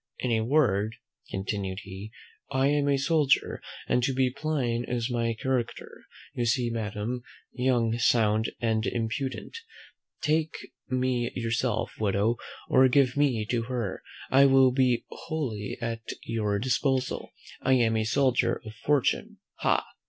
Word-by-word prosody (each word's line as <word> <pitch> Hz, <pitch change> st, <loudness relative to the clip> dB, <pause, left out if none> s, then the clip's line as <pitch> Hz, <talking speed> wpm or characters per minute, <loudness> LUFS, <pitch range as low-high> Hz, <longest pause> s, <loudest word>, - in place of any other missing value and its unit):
In 125 Hz, -, -2 dB
a 110 Hz, -1 st, +2 dB
word," 110 Hz, -6 st, +2 dB, 0.3 s
continued 95 Hz, 0 st, -3 dB
he, 100 Hz, +2 st, -8 dB, 0.4 s
"I 135 Hz, +1 st, +2 dB
am 145 Hz, -1 st, +2 dB
a 140 Hz, -, +3 dB
soldier, 150 Hz, 0 st, +2 dB, 0.3 s
and 125 Hz, -, +2 dB
to 130 Hz, +2 st, +1 dB
be 130 Hz, -1 st, +2 dB
plain 130 Hz, -5 st, -1 dB
is 120 Hz, 0 st, -2 dB
my 115 Hz, -1 st, 0 dB
character: 120 Hz, 0 st, -3 dB, 0.3 s
you 120 Hz, -, -1 dB
see 120 Hz, 0 st, +1 dB
me, 115 Hz, -, -2 dB
Madam, 110 Hz, +3 st, -3 dB, 0.3 s
young, 120 Hz, -3 st, +1 dB
sound, 110 Hz, -2 st, +3 dB
and 110 Hz, -2 st, 0 dB
impudent; 130 Hz, -, -3 dB, 0.6 s
take 155 Hz, +1 st, +1 dB, 0.3 s
me 125 Hz, -2 st, 0 dB
yourself, 115 Hz, -1 st, -1 dB
widow, 105 Hz, +2 st, +1 dB, 0.3 s
or 130 Hz, 0 st, +6 dB
give 130 Hz, 0 st, +3 dB
me 135 Hz, -7 st, +2 dB
to 120 Hz, -2 st, +1 dB
her, 115 Hz, -6 st, -3 dB, 0.3 s
I 140 Hz, +1 st, +7 dB
will 135 Hz, -1 st, +6 dB
be 125 Hz, -2 st, +2 dB
wholly 125 Hz, -11 st, -4 dB
at 115 Hz, -1 st, -3 dB, 0.2 s
your 105 Hz, -3 st, -1 dB
disposal. 130 Hz, +3 st, 0 dB, 0.3 s
I 130 Hz, -, +3 dB
am 115 Hz, -3 st, +3 dB
a 110 Hz, -, +1 dB
soldier 130 Hz, +2 st, +2 dB
of 110 Hz, -, -8 dB
fortune, 140 Hz, +5 st, 0 dB, 0.2 s
ha!" -, -, +2 dB
120 Hz, 140 wpm, -28 LUFS, 110-130 Hz, 0.6 s, I